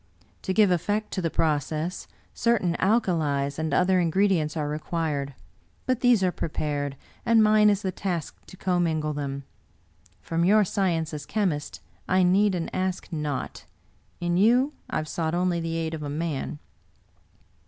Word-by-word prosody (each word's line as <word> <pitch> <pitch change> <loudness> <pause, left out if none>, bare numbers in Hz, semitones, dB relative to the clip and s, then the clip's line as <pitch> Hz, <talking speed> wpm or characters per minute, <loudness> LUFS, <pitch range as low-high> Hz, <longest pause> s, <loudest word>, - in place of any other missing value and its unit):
To - - -3
give 205 -1 +4
effect 205 +5 0
to 190 - -2
the 165 - 0
process, 155 +3 -1 0.3
certain 200 -8 +1
alkalies 160 -10 +1
and 160 0 -1
other 185 0 +3
ingredients 170 -2 +1
are 150 -1 -1
required; 150 -2 -2 0.5
but 255 -2 +1
these 245 -6 +4
are 180 - +2
prepared, 145 -4 -3 0.3
and 230 -1 +5
mine 215 0 +5
is 205 -1 +1
the 190 - -1
task 180 -4 -3
to 185 - -13
commingle 165 -5 0
them. 140 -1 -4 0.8
From 165 0 -1
your 210 +4 +5
sci 195 -1 +1
ence 160 -2 -2
as 145 -1 -6
chemist 180 -9 -2 0.3
I 185 0 +3
need 190 +2 +3
and 170 -2 -4
ask 185 0 -2
naught. 150 -4 -4 0.5
In 175 0 0
you 245 +8 +4 0.2
I - - -4
have 155 - -1
sought 160 +1 -2
only 180 -1 +1
the 165 0 -3
aid 165 0 -2
of 160 - -5
a 145 - -4
man." 155 -1 -3
170 Hz, 160 wpm, -26 LUFS, 155-195 Hz, 0.8 s, and